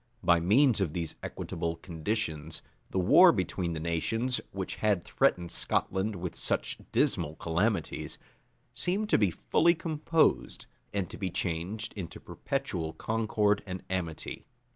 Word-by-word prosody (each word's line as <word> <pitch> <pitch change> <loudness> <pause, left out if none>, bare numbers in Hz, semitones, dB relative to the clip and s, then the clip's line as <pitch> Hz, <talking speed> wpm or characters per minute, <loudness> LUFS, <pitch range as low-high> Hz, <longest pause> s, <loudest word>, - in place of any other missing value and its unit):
[*] - - -35
By 85 -1 +5
means 110 - +4
of 85 -6 0
these 85 -3 -2
equitable 85 0 -3
conditions, 80 -2 -3 0.3
the - - -3
war 90 - +8
between 85 -2 -1
the 80 - -3
nations, 115 +10 0
which 95 -1 -4
had 105 -5 +1
threatened 85 -1 +1
Scotland 95 - 0
with 90 -1 -5
such - - -1
dismal 75 +2 +1
calamities, 95 +8 -1 0.6
seemed 185 - -1
to - - +5
be 100 -3 +4
fully 170 - +3
composed, 160 0 +1 0.3
and 100 -2 -1
to - - -8
be 95 -3 -1
changed 90 +5 -2
into 95 -5 -6
perpetual 90 -13 -3
concord 105 -2 +1
and 90 0 -5
amity. 85 -4 -4
95 Hz, 140 wpm, -30 LUFS, 85-110 Hz, 0.6 s, war